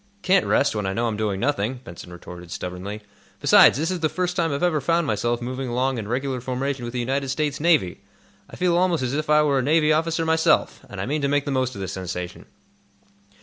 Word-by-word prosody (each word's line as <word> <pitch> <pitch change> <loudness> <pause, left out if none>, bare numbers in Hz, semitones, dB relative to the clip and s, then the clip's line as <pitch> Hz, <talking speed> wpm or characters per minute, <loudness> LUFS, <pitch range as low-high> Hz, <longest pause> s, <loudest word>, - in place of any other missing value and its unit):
"Can't 190 0 +3
rest, 140 -4 +2
when 105 -2 -2
I 95 - -1
know 115 +4 -1
I'm 115 -2 -1
doing 105 -2 -2
nothing," 125 -1 0
Benson 90 -5 -11
retorted, 90 0 -10
stubbornly. 90 +5 -6 0.4
"Besides, - - +6
this 160 +5 -1
is 180 - -2
the 160 -1 +1
first 180 +1 -2
time 165 -3 0
I've 140 +4 -2
ever 160 -4 +2
found 165 +4 +1
myself 120 +1 -1
moving 130 +1 -4
along 130 +1 0
in 105 - -6
regular 130 +2 -2
formation 130 +1 -3
with 120 - -6
the 125 - -2
United 135 +3 -1
States 145 +1 -1
Navy. 150 - +2 0.5
I - - -11
feel 180 -1 +1
almost 175 -5 +2
as 125 0 -2
if 150 +1 -2
I 150 0 +5
were 140 -2 +2
a - - +1
Navy 155 +3 +3
officer 165 +1 0
myself, 160 0 +2
and - - -8
I - - -2
mean 150 +3 -1
to 140 - +1
make 145 0 +1
the 145 - -2
most 130 -1 -1
of 100 - -6
the 95 - -3
sensation. 90 -1 -6
135 Hz, 230 wpm, -23 LUFS, 110-155 Hz, 0.5 s, Besides